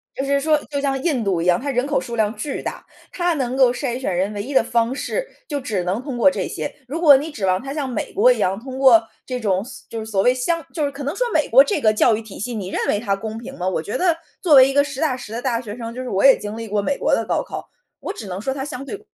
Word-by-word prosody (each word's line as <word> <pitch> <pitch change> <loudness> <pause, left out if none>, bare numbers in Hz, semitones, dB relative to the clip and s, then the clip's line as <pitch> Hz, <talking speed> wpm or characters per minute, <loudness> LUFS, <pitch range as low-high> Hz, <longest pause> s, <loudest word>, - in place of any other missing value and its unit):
就 270 - -2
是 280 0 +2
说， 305 +1 +3
就 285 -1 -2
像 270 -1 -1
印 285 -9 0
度 190 -4 0
一 170 - -2
样， 180 -1 +4
它 280 +2 -3
人 250 +2 0
口 295 - +1
数 235 - -6
量 215 0 0
巨 270 +6 -4
大， - - -6 0.3
它 350 -1 0
能 260 -3 -2
够 255 -2 +5
筛 250 -1 -3
选 195 -9 -2
人 190 +4 0
唯 205 0 -4
一 280 - -6
的 260 - +5
方 235 +1 +1
式， - - -3 0.2
就 290 -2 -2
只 210 -8 -2
能 185 +5 -1
通 270 -4 -5
过 280 - +6
这 - - -3
些。 - - -5
如 320 +6 -4
果 290 -5 +8
你 305 +3 -5
指 205 -9 -3
望 185 0 +2
它 275 +1 -6
像 285 -4 -3
美 235 - -4
国 475 +6 +5
一 - - +1
样， 190 +3 0
通 260 +2 -8
过 230 -5 +6 0.2
这 250 -1 -4
种 195 -3 0
所 - - -12
就 225 - -5
是 220 - -5
所 200 -3 0
谓 250 - +5
相 325 +6 -1
就 305 -4 -1
是 280 - -2
可 280 0 -8
能 285 +7 -3
说 - - 0
美 - - +1
国 - - +8
这 365 -10 -1
个 215 - +5
教 215 +1 +3
育 225 - -4
体 220 -3 -11
系， 240 +4 -4
你 200 -5 -4
认 - - -2
为 205 - +1
它 200 -3 0
公 220 +2 -6
平 235 - -9
吗？ 180 - -2
我 180 -4 0
觉 205 - -4
得 355 -3 +2 0.2
作 345 -5 +2
为 265 -1 +8
一 275 - -2
个 285 0 +4
实 280 0 -6
打 270 -5 +1
实 220 -3 -10
的 235 - -3
大 240 -3 0
学 215 -4 -7
生， 230 -1 -6
就 255 - -5
是 250 - -5
我 195 - 0
也 270 -1 +8
经 210 +1 -6
历 225 -1 -6
过 205 0 -1
美 280 +8 0
国 - - +1
的 - - -2
高 - - 0
考， - - -8 0.3
我 - - -4
只 210 - -8
能 185 +1 -5
说 265 +5 -2
它 270 0 -4
相 275 -2 -6
对 415 +7 -7
250 Hz, 340 characters per minute, -21 LUFS, 215-280 Hz, 0.3 s, 果